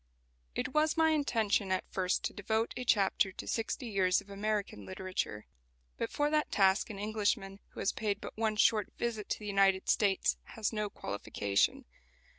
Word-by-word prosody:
It -, -, -1 dB
was 310 Hz, +1 st, +2 dB
my 320 Hz, 0 st, +5 dB
intention 225 Hz, -9 st, +1 dB
at 185 Hz, -, +1 dB
first 185 Hz, -1 st, 0 dB
to -, -, -2 dB
devote 220 Hz, +3 st, -1 dB
a 250 Hz, -, -3 dB
chapter 200 Hz, -4 st, +3 dB
to -, -, -8 dB
Sixty 230 Hz, +4 st, -2 dB
Years 190 Hz, -5 st, +2 dB
of 200 Hz, -, -13 dB
American 205 Hz, -, -2 dB
Literature. 105 Hz, -, -4 dB, 0.5 s
But -, -, -2 dB
for 295 Hz, 0 st, +1 dB
that 305 Hz, 0 st, +1 dB
task 195 Hz, +1 st, +3 dB
an 210 Hz, -, -6 dB
Englishman 205 Hz, -2 st, -1 dB
who -, -, -6 dB
has -, -, +2 dB
paid 205 Hz, -2 st, -2 dB
but -, -, -8 dB
one 220 Hz, -1 st, 0 dB
short 210 Hz, -1 st, +3 dB
visit 225 Hz, -3 st, -3 dB
to -, -, 0 dB
the 210 Hz, -, -10 dB
United 195 Hz, -2 st, +3 dB
States 200 Hz, -3 st, +2 dB, 0.2 s
has 220 Hz, 0 st, -1 dB
no 210 Hz, -1 st, -1 dB
qualification. 100 Hz, -, -1 dB
205 Hz, 175 wpm, -32 LUFS, 190-225 Hz, 0.5 s, my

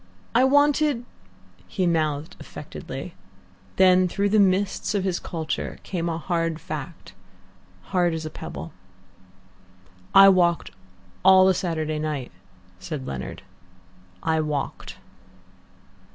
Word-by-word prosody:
I 245 Hz, +3 st, +5 dB
wanted 285 Hz, -2 st, +3 dB, 0.3 s
" -, -, -29 dB
He 185 Hz, -, +2 dB
mouthed 155 Hz, -3 st, 0 dB
affectedly. -, -, -8 dB, 0.6 s
Then 185 Hz, -1 st, +5 dB
through 200 Hz, +3 st, 0 dB
the 215 Hz, +1 st, +3 dB
mists 195 Hz, +1 st, +1 dB
of 195 Hz, -, 0 dB
his 185 Hz, -2 st, -1 dB
culture 160 Hz, -2 st, -4 dB
came 170 Hz, -2 st, -3 dB
a 165 Hz, -, -2 dB
hard 165 Hz, -1 st, -1 dB
fact, 155 Hz, 0 st, -7 dB, 0.8 s
hard 175 Hz, -3 st, +2 dB
as 160 Hz, -1 st, -5 dB
a 155 Hz, -, -5 dB
pebble. 75 Hz, +3 st, -8 dB, 1.4 s
"I 195 Hz, 0 st, +10 dB
walked 175 Hz, -, +3 dB, 0.5 s
all 190 Hz, 0 st, +7 dB
the 190 Hz, -, +5 dB
Saturday 160 Hz, -4 st, -2 dB
night," 150 Hz, -5 st, -3 dB, 0.5 s
said 140 Hz, -, -6 dB
Leonard. 65 Hz, -1 st, -6 dB, 0.8 s
"I 160 Hz, -1 st, +1 dB
walked." 150 Hz, -2 st, -4 dB
170 Hz, 115 wpm, -24 LUFS, 155-190 Hz, 1.4 s, I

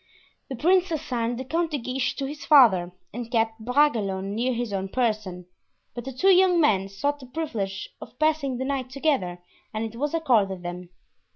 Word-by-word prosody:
The 265 Hz, -, -4 dB
prince 360 Hz, +8 st, +3 dB
assigned 245 Hz, -7 st, -2 dB
the 260 Hz, -, -5 dB
Count 330 Hz, +5 st, 0 dB
de 300 Hz, -, -2 dB
Guiche 255 Hz, +1 st, -2 dB
to 275 Hz, -, -3 dB
his 290 Hz, +2 st, -7 dB
father 205 Hz, -, +6 dB, 0.2 s
and 235 Hz, +1 st, -6 dB
kept 225 Hz, -1 st, 0 dB
Bragelonne 215 Hz, -7 st, +1 dB
near 240 Hz, +4 st, 0 dB
his 240 Hz, -3 st, -3 dB
own 195 Hz, 0 st, -2 dB
person; 215 Hz, -7 st, -1 dB, 0.5 s
but 240 Hz, -1 st, -7 dB
the 270 Hz, -, -4 dB
two 375 Hz, +10 st, +4 dB
young 365 Hz, -1 st, +5 dB
men 195 Hz, -, +2 dB
sought 285 Hz, +9 st, -2 dB
the 260 Hz, -, -12 dB
privilege 230 Hz, -10 st, -4 dB
of -, -, -11 dB
passing 310 Hz, -4 st, +1 dB
the 260 Hz, -, -3 dB
night 265 Hz, -2 st, -2 dB
together 260 Hz, -, -1 dB, 0.3 s
and 220 Hz, +1 st, -3 dB
it 225 Hz, 0 st, -7 dB
was 295 Hz, +3 st, -1 dB
accorded 210 Hz, -, +1 dB
them. 175 Hz, 0 st, -6 dB
250 Hz, 185 wpm, -25 LUFS, 205-290 Hz, 0.5 s, father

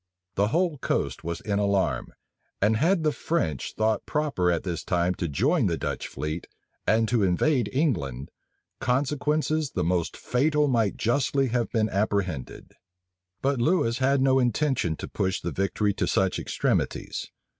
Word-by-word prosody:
The 100 Hz, +1 st, +2 dB
whole 165 Hz, -, 0 dB
coast -, -, -1 dB
was 85 Hz, 0 st, -4 dB
in 100 Hz, -2 st, -1 dB
alarm; 100 Hz, -10 st, 0 dB, 0.5 s
and 105 Hz, +3 st, +3 dB
had 170 Hz, -, +2 dB
the 155 Hz, -, +3 dB
French 100 Hz, -, -2 dB
thought 110 Hz, 0 st, +1 dB
proper 145 Hz, -, 0 dB
at 85 Hz, -1 st, 0 dB
this 85 Hz, -3 st, -3 dB
time 90 Hz, 0 st, +1 dB
to 90 Hz, -, -3 dB
join 70 Hz, -, +2 dB
the -, -, 0 dB
Dutch -, -, -3 dB
fleet, 75 Hz, +2 st, -5 dB, 0.4 s
and 110 Hz, +1 st, +3 dB
to 120 Hz, -1 st, +1 dB
invade 105 Hz, -, +2 dB
England, 70 Hz, -, -1 dB, 0.5 s
consequences 150 Hz, +3 st, 0 dB
the -, -, +1 dB
most 85 Hz, 0 st, 0 dB
fatal 150 Hz, +4 st, +1 dB
might 115 Hz, -6 st, +1 dB
justly 135 Hz, +2 st, +1 dB
have 120 Hz, -1 st, 0 dB
been 110 Hz, -2 st, +2 dB
apprehended. 100 Hz, -, -2 dB, 0.7 s
But 135 Hz, -2 st, +1 dB
Lewis 120 Hz, -5 st, +2 dB
had 135 Hz, +1 st, +3 dB
no 135 Hz, 0 st, +4 dB
intention 125 Hz, -, +1 dB
to -, -, -7 dB
push 95 Hz, -1 st, -1 dB
the 85 Hz, -, -4 dB
victory 100 Hz, +2 st, 0 dB
to 90 Hz, -, -1 dB
such 95 Hz, +1 st, +1 dB
extremities. -, -, -1 dB
110 Hz, 155 wpm, -26 LUFS, 90-140 Hz, 0.7 s, no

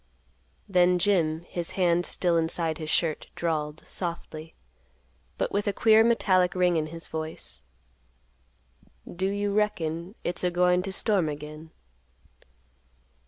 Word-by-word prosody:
Then 180 Hz, -1 st, +4 dB
Jim, 170 Hz, -4 st, +2 dB
his 170 Hz, -1 st, -4 dB
hand 175 Hz, -1 st, +2 dB
still 175 Hz, -2 st, +1 dB
inside 165 Hz, -1 st, 0 dB
his 155 Hz, -1 st, -5 dB
shirt, 155 Hz, -1 st, 0 dB
drawled, 155 Hz, -3 st, -2 dB
softly, 165 Hz, -2 st, -5 dB, 0.8 s
but -, -, -1 dB
with 205 Hz, +1 st, -1 dB
a 205 Hz, -, +1 dB
queer 220 Hz, +1 st, +5 dB
metallic 185 Hz, -6 st, +3 dB
ring 180 Hz, -1 st, +3 dB
in 155 Hz, -1 st, 0 dB
his 165 Hz, +1 st, -6 dB
voice, 160 Hz, -, -6 dB, 1.5 s
"Do 190 Hz, +2 st, 0 dB
you 205 Hz, 0 st, -1 dB
reckon 180 Hz, -3 st, -1 dB
it's 175 Hz, -, -2 dB
a 180 Hz, -, +3 dB
goin' 180 Hz, 0 st, +3 dB
t' 195 Hz, -, -4 dB
storm 190 Hz, -4 st, +1 dB
again?" 150 Hz, +2 st, -8 dB
175 Hz, 125 wpm, -27 LUFS, 160-190 Hz, 1.5 s, queer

